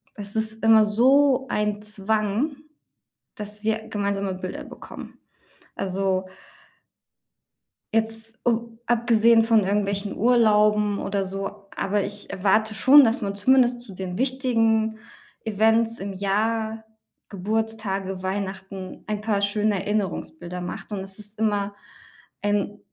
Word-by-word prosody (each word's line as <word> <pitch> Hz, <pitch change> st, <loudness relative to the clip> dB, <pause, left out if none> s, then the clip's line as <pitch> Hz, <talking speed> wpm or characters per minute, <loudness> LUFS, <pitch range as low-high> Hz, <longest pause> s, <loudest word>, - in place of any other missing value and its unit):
Es 205 Hz, -1 st, -1 dB
ist 220 Hz, 0 st, +2 dB
immer 220 Hz, -1 st, +6 dB
so 265 Hz, +5 st, +3 dB
ein 210 Hz, 0 st, -1 dB
Zwang, 215 Hz, +6 st, +1 dB, 0.8 s
dass 210 Hz, -2 st, -4 dB
wir 220 Hz, 0 st, -1 dB
gemeinsame 200 Hz, -2 st, -2 dB
Bilder 185 Hz, 0 st, -6 dB
bekommen. -, -, -11 dB, 0.6 s
Also 190 Hz, 0 st, -1 dB, 1.7 s
jetzt, 225 Hz, 0 st, -1 dB
u 230 Hz, -1 st, -1 dB
abgesehen 230 Hz, -1 st, +4 dB
von 225 Hz, -2 st, +3 dB
irgendwelchen 200 Hz, 0 st, -1 dB
Urlauben 210 Hz, -3 st, +3 dB
oder 195 Hz, -1 st, -2 dB
so. 195 Hz, +1 st, -6 dB
Aber 200 Hz, +1 st, 0 dB
ich 205 Hz, +1 st, -3 dB
erwarte 210 Hz, +3 st, +1 dB
schon, 270 Hz, +6 st, +7 dB
dass 230 Hz, +3 st, 0 dB
man 200 Hz, -2 st, -3 dB
zumindest 245 Hz, +3 st, +3 dB
zu 215 Hz, -5 st, -11 dB
den 185 Hz, -1 st, -6 dB
wichtigen 225 Hz, -4 st, +1 dB, 0.5 s
Events 225 Hz, +2 st, +2 dB
im 195 Hz, +1 st, -5 dB
Jahr, 220 Hz, +3 st, -1 dB, 0.4 s
Geburtstage, 200 Hz, -2 st, -3 dB
Weihnachten, 190 Hz, 0 st, -5 dB
ein 210 Hz, -1 st, -3 dB
paar 210 Hz, -2 st, 0 dB
schöne 210 Hz, +1 st, +1 dB
Erinnerungsbilder 180 Hz, -4 st, -3 dB
macht. 180 Hz, +4 st, -7 dB
Und 205 Hz, -, -3 dB
es 195 Hz, +2 st, -6 dB
ist 210 Hz, +1 st, -8 dB
immer 205 Hz, -2 st, -1 dB, 0.7 s
ein 205 Hz, 0 st, -1 dB
210 Hz, 120 wpm, -24 LUFS, 200-225 Hz, 1.7 s, schon